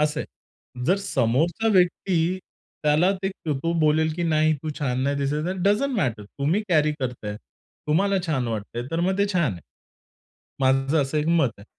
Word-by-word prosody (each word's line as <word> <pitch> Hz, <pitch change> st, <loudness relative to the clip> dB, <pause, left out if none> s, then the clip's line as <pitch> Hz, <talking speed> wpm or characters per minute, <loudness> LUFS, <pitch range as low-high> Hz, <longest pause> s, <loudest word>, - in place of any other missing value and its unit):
असं 150 Hz, 0 st, +1 dB
आहे. 125 Hz, -4 st, -11 dB
जर 185 Hz, -, +4 dB
समोरचा 170 Hz, -, +1 dB
व्यक्ती 180 Hz, -1 st, +2 dB, 0.4 s
त्याला 150 Hz, +5 st, +4 dB
ते 190 Hz, -, +1 dB
तो 165 Hz, -2 st, -3 dB
बोलेल, 155 Hz, +1 st, +3 dB
की 175 Hz, -, -3 dB
"नाही, 155 Hz, -1 st, +3 dB
तू 155 Hz, -, -3 dB
छान 130 Hz, -3 st, -1 dB
नाही 140 Hz, +1 st, 0 dB
दिसत 145 Hz, +3 st, -1 dB
आहे," 185 Hz, -, -1 dB
डझन्ट 220 Hz, +6 st, +2 dB
मॅटर. 120 Hz, -, -1 dB
तुम्ही 150 Hz, -, -1 dB
कॅरी 155 Hz, -3 st, +3 dB
करताहेत. 120 Hz, -5 st, -4 dB, 0.5 s
तुम्हाला 195 Hz, +6 st, +2 dB
छान 135 Hz, -7 st, 0 dB
वाटतंय, 110 Hz, +2 st, -4 dB
तर 165 Hz, -, -1 dB
मग 190 Hz, +3 st, 0 dB
ते 200 Hz, -, +3 dB
छान 170 Hz, -, +1 dB
आहे. 85 Hz, -, -9 dB, 1.0 s
माझं 135 Hz, +3 st, +2 dB
असं 135 Hz, +3 st, -2 dB
एक 150 Hz, -, -1 dB
मत 160 Hz, -7 st, +3 dB
आहे. 100 Hz, -, -13 dB
155 Hz, 175 wpm, -24 LUFS, 135-175 Hz, 1.0 s, जर